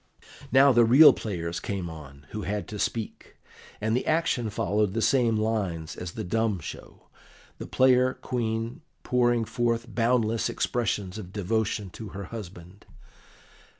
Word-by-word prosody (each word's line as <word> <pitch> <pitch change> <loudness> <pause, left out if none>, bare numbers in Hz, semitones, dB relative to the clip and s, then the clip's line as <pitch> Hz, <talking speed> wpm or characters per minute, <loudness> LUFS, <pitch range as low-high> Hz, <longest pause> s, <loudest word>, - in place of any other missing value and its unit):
Now 135 +1 +6
the 120 -1 +5
real 130 +7 +8
players 85 -5 -4
came 95 -3 -4
on, 75 -3 -11
who 105 - -4
had 105 0 -3
to 105 - -6
speak, 115 +1 -4 0.4
and 110 +1 0
the 125 - -1
action 155 -8 +1
followed 105 0 0
the 115 - 0
same 120 -5 +3
lines 100 -8 -2
as 90 -1 -7
the 110 - -5
dumb 110 0 0
show, 75 - -10 0.6
the - - -6
player 130 0 +3
Queen 115 +2 -3 0.2
pouring 120 -2 +2
forth 115 +1 -1
boundless 115 0 +1
expressions 105 -4 -2
of 95 -3 -9
devotion 105 -1 -2
to 110 - -8
her 100 - -5
husband. 95 -3 -10
110 Hz, 145 wpm, -27 LUFS, 100-120 Hz, 0.6 s, real